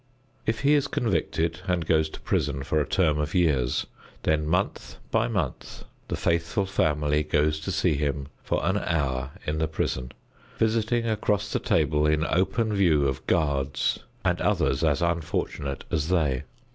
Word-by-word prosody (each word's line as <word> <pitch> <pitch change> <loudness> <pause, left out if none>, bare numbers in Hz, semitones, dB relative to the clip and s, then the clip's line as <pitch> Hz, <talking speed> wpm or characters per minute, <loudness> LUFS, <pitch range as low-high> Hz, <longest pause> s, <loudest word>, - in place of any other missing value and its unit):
If 110 +1 0
he 140 +1 +4
is 145 -1 +3
convicted 85 - 0
and 90 -3 0
goes 80 0 +2
to - - -10
prison 70 -2 -1
for 75 +2 +1
a - - -2
term 80 -5 +2
of 75 +4 -2
years, 70 -9 +2 0.4
then 75 -1 +1
month 90 +5 -1
by 115 +1 +2
month 95 - -3 0.2
the - - -2
faithful 85 +5 0
family 75 -5 +1
goes 75 0 +1
to 75 - -4
see - - +2
him 70 -1 -2
for - - -1
an 95 +4 +2
hour 70 -7 -1
in 75 +1 -1
the 80 - +1
prison, 65 -5 -2 0.5
visiting 115 +1 +1
across 105 -2 0
the - - +1
table 75 0 +2
in 75 +1 +2
open 95 +6 +1
view 80 -8 +3
of 65 0 -4
guards 70 -5 +1 0.3
and - - +1
others 65 - +1
as 80 0 +2
unfortunate 80 -4 -2
as 80 -2 0
they. 75 -8 +1
80 Hz, 160 wpm, -26 LUFS, 75-95 Hz, 0.5 s, he